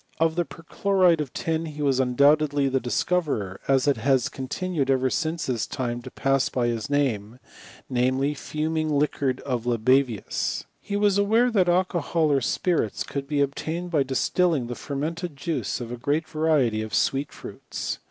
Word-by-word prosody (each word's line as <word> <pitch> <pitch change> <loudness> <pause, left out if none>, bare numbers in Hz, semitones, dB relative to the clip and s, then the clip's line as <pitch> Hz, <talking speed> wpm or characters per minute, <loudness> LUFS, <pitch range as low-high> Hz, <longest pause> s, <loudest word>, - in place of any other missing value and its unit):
Of 160 0 +2
the 175 -1 +1
perchloride 180 0 +1
of 140 -4 -5
tin 160 0 -2
he 150 -1 -5
was 135 -2 +2
undoubtedly 140 +2 +3
the 135 0 +1
dis 125 -1 -1
eoverer, 140 - -1
as 135 0 +3
it 140 -4 +3
has 130 +1 +2
continued 140 +2 -3
ever 130 -1 +2
since 165 +1 -1
his 120 -4 -1
time 120 -2 -3
to - - -9
pass 135 -1 +1
by 120 -2 0
his 115 0 -3
name; 125 -6 0 0.5
ndjaely, 130 +3 +1
fuming 155 +2 -2
liquor 140 -2 +1
of 125 -3 -2
Libavius, 120 -1 +1 0.2
He 200 - -5
was 205 -1 +3
aware, 225 +5 +3
that 190 -5 +3
alcohol 170 -3 +1
or 140 -1 +3
spirits 145 - 0
could 140 -1 -5
be 145 -1 +2
ob« 140 0 -2
tained 170 +4 -4
by 155 -4 +3
distilling 135 +2 +1
the 120 - -4
fermented 155 +6 -4
jiiice 145 +2 -2
of 120 -1 -6
a 120 - -4
great 145 +6 -1
va 155 -1 -8
riety 135 -9 +2
of 110 - -4
sweet 135 +1 +1
fruits. - - -6
140 Hz, 175 wpm, -25 LUFS, 130-165 Hz, 0.5 s, undoubtedly